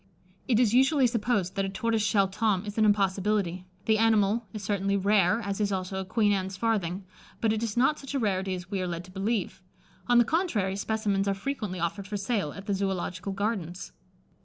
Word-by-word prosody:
It 235 -4 +3
is 235 -3 +3
usually 265 +2 +4
supposed 215 -5 0
that 195 - 0
a 195 - -2
tortoiseshell 210 -1 +1
Tom 205 -1 0
is 205 0 -6
an 215 - +5
impossibility. 195 -2 +1 0.2
The 220 -1 +3
animal 220 0 +3
is 215 -2 -7
certainly 200 0 0
rare, 200 0 +3
as 200 -1 -3
is 205 -1 +1
also 190 0 -2
a - - -6
Queen 210 +2 +2
Anne's 190 -1 -1
farthing; 195 -4 -1 0.3
but 220 -1 +2
it 220 - -2
is 230 -1 -3
not 265 +5 +3
such 275 0 -7
a - - +1
rarity 190 -4 0
as 180 +2 -9
we 195 -2 -1
are 185 - -2
led 170 0 -4
to 185 - -14
believe. 195 +1 -2 0.5
On 245 0 +5
the 240 - +6
contrary, 235 - 0
specimens 200 -1 -1
are 195 - +1
frequently 210 -5 -4
offered 185 +4 -3
for 205 0 -3
sale 200 -5 -1
at 195 +4 -10
the 200 - -1
Zoological 190 -1 -2
Gardens. 195 -4 -3
200 Hz, 205 wpm, -28 LUFS, 190-225 Hz, 0.5 s, the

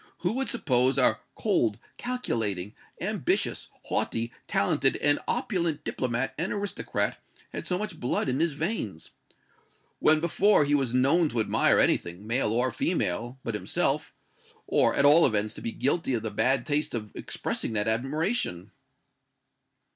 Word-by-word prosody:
"Who 180 - +1
would 265 +4 -1
suppose 130 - +2
our 130 - +3 0.2
cold, 105 -3 +1 0.2
calculating, 110 - -3 0.3
ambitious, - - -1 0.2
haughty, 115 +1 -2 0.2
talented 135 +6 +2
and 145 0 +4
opulent 170 - -1
diplomat 125 -1 -2
and 170 - -1
aristocrat 205 -1 -2 0.3
had - - -5
so 180 - 0
much 190 -5 -5
blood 125 - -1
in 130 +1 0
his 165 -1 +1
veins? 140 - -4 0.9
When 155 0 +4
before 170 +1 +3
was 140 -4 +1
he 125 - +1
known 150 +6 +3
to 120 - -2
admire 110 - +3
anything, 90 +4 +1
male 115 0 +1
or 125 +3 +1
female 120 - -1
but 115 - -3
himself 105 - -1 0.5
or, - - +2
at 140 - +3
all 155 +4 +7
events, 110 -2 +1
to - - -10
be 115 - -3
guilty 140 0 0
of 115 - -3
the 110 - -3
bad 130 +4 +1
taste 145 -2 -1
of 105 -2 -5
expressing - - -3
that 105 0 0
admiration?" 135 - -1
135 Hz, 145 wpm, -27 LUFS, 115-165 Hz, 0.9 s, all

